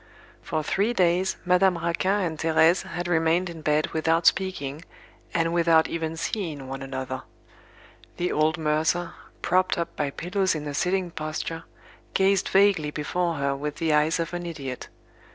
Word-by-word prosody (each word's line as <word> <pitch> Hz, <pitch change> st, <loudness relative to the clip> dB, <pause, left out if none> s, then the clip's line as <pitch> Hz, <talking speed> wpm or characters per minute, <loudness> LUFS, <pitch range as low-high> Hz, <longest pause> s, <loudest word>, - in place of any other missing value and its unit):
For 155 Hz, -, -2 dB
three 200 Hz, +9 st, +1 dB
days, 185 Hz, -2 st, +2 dB
Madame 180 Hz, 0 st, +4 dB
Raquin 170 Hz, +4 st, 0 dB
and 165 Hz, -4 st, -2 dB
Thérèse 160 Hz, +2 st, +4 dB
had 175 Hz, 0 st, -4 dB
remained 170 Hz, +1 st, +2 dB
in 165 Hz, -1 st, -9 dB
bed 150 Hz, 0 st, +1 dB
without 165 Hz, +1 st, +1 dB
speaking, 155 Hz, -6 st, +1 dB, 0.5 s
and 165 Hz, 0 st, 0 dB
without 165 Hz, -2 st, +4 dB
even 165 Hz, -1 st, -3 dB
seeing 160 Hz, -8 st, -3 dB
one 135 Hz, +1 st, -6 dB
another. 130 Hz, -1 st, -4 dB, 1.0 s
The 175 Hz, +1 st, -1 dB
old 155 Hz, +2 st, +2 dB
mercer, 160 Hz, +2 st, 0 dB, 0.3 s
propped 185 Hz, 0 st, +2 dB
up 170 Hz, 0 st, -3 dB
by 145 Hz, -2 st, -1 dB
pillows 180 Hz, +5 st, -1 dB
in 150 Hz, -1 st, -4 dB
a 145 Hz, -, -4 dB
sitting 180 Hz, +3 st, 0 dB
posture, 155 Hz, +1 st, -4 dB, 0.5 s
gazed 195 Hz, 0 st, +3 dB
vaguely 195 Hz, -6 st, +4 dB
before 170 Hz, +3 st, -1 dB
her 140 Hz, -1 st, 0 dB
with 150 Hz, +1 st, -4 dB
the 160 Hz, -1 st, 0 dB
eyes 150 Hz, +3 st, +3 dB
of 165 Hz, +1 st, -3 dB
an 175 Hz, 0 st, -4 dB
idiot. 135 Hz, -6 st, -6 dB
165 Hz, 155 wpm, -25 LUFS, 155-180 Hz, 1.0 s, Madame